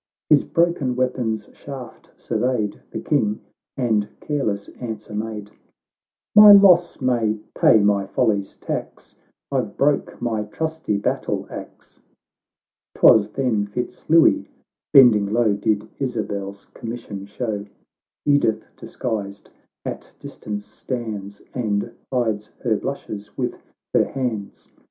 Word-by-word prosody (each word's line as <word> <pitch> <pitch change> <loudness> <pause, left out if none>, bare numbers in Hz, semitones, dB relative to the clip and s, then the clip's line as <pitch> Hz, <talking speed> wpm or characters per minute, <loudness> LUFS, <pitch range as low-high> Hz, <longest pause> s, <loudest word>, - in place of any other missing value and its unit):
His 150 - +6
broken 165 -7 +1
weapon's 120 -4 -1
shaft 130 -4 -10
surveyed 120 -5 -1
The - - -5
King, 110 -8 +1 0.4
and 110 -5 +1
careless 110 -9 -2
answer 110 -3 -6
made,— 105 -1 -5 0.5
" - - -71
My 210 -1 +11
loss 180 -3 +6
may 120 -4 +1 0.2
pay 110 - +5
my 100 -1 +2
folly's 100 -3 0
tax; - - -6 0.4
I've - - -2
broke - - +1
my 110 -3 -1
trusty 160 0 -2
battle 100 - -2
axe." - - -10 0.5
— - - -70
JTwas 105 -1 +6
then 115 -6 0
Fitz 120 +4 -6
Louis, 165 0 +5 0.4
bending 110 -7 +6
low, 115 -2 +3
Did 105 +1 0
Isabel's 100 -7 -4
commission 115 -5 -7
show; 105 -2 -4 0.6
Edith, 145 -6 +2
disguised, 100 -4 -5 0.3
at - - -7
distance 105 -1 -7
stands, 105 -5 -6
And 110 -2 -1 0.2
hides 110 -5 0 0.2
her 115 -3 +2
blushes 105 -4 -6
with - - -3 0.3
her - - +4
hands. 115 -7 -4
110 Hz, 115 wpm, -22 LUFS, 105-130 Hz, 0.6 s, My